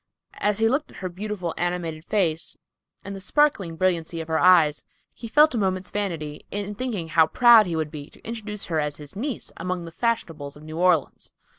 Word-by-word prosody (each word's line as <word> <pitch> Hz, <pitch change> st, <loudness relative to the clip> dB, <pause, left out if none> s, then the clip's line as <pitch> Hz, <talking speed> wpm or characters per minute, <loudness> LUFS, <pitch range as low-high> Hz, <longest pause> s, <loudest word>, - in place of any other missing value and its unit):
As 210 Hz, -1 st, +1 dB
he 225 Hz, 0 st, +3 dB
looked 275 Hz, +6 st, 0 dB
at -, -, -14 dB
her 185 Hz, -, -4 dB
beautiful, 185 Hz, -2 st, -4 dB
animated 175 Hz, -3 st, -2 dB
face, 170 Hz, -7 st, 0 dB, 0.5 s
and 200 Hz, -, -6 dB
the 195 Hz, -, -8 dB
sparkling 205 Hz, -, +1 dB
brilliancy 170 Hz, -1 st, 0 dB
of 160 Hz, 0 st, -6 dB
her 160 Hz, 0 st, +1 dB
eyes, 170 Hz, -5 st, +5 dB, 0.3 s
he 235 Hz, -, -8 dB
felt 300 Hz, +6 st, +5 dB
a 235 Hz, -, 0 dB
moment's 185 Hz, -2 st, -1 dB
vanity 165 Hz, -8 st, -3 dB
in 205 Hz, 0 st, -3 dB
thinking 210 Hz, -7 st, -4 dB
how 160 Hz, 0 st, +5 dB
proud 235 Hz, 0 st, +7 dB
he 170 Hz, -, -2 dB
would 155 Hz, -2 st, -2 dB
be 145 Hz, -1 st, -8 dB
to -, -, -15 dB
introduce 215 Hz, -3 st, -5 dB
her 160 Hz, -2 st, -1 dB
as 150 Hz, -1 st, -2 dB
his 145 Hz, -1 st, -11 dB
niece 250 Hz, +3 st, -4 dB
among 180 Hz, 0 st, -3 dB
the 165 Hz, -, -9 dB
fashionables 165 Hz, -10 st, -2 dB
of 150 Hz, -, -14 dB
New 155 Hz, +1 st, -7 dB
Orleans. 180 Hz, -5 st, +1 dB
180 Hz, 200 wpm, -24 LUFS, 160-210 Hz, 0.5 s, proud